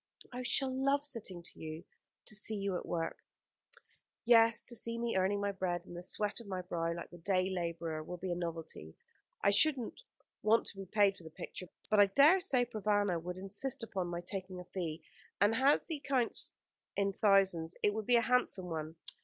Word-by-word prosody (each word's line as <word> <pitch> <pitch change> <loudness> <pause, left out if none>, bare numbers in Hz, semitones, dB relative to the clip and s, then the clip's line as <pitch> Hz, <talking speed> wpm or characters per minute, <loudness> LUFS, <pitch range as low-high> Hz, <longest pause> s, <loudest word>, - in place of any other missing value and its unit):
"I 250 - -4
shall 260 +1 +1
love 275 +2 +2
sitting 220 -11 -2
to - - -14
you. 160 +1 -6 0.4
To - - -3
see 215 +1 0
you 200 -2 -1
at - - -4
work 165 -1 -3 0.5
" - - -27 0.3
"Yes, 230 -1 +6
to 240 - 0
see 230 0 -1
me 235 0 -1
earning 190 +2 +2
my 200 0 0
bread 180 -3 -2
in - - -11
the 175 - -6
sweat 205 +4 -1
of 230 - -11
my 185 -2 -3
brow, 170 -2 -2
like 170 0 -6
the 175 - -11
day 185 +1 +1
labourer, 170 -3 -3
will 180 +3 -6
be 180 +1 -4
a - - 0
novelty. 165 - -5 0.5
I 200 - +5
shouldn't 265 - +2 0.4
want 220 +2 +4
to - - -7
be 195 -1 -7
paid 200 0 +3
for - - -15
the 160 - -9
picture, 175 +2 -8 0.2
but 215 - +5
I 205 - +8
dare 295 - +6
say 250 -7 +2
Provana 205 -6 0
would 180 +2 -5
insist 200 +7 -3
upon 190 -5 -3
my 175 0 -4
taking 185 0 -4
a - - -7
fee, 170 -3 -4 0.4
and 205 +2 +4
as 270 +5 +3
he 320 -3 -3
counts 265 -4 0 0.4
in 200 0 +1
thousands, 190 -5 +3
it 205 - +4
would 220 -1 -4
be 245 - +5
a 235 - +6
handsome 200 -8 +1
one. 160 0 -4
195 Hz, 205 wpm, -34 LUFS, 175-230 Hz, 0.5 s, I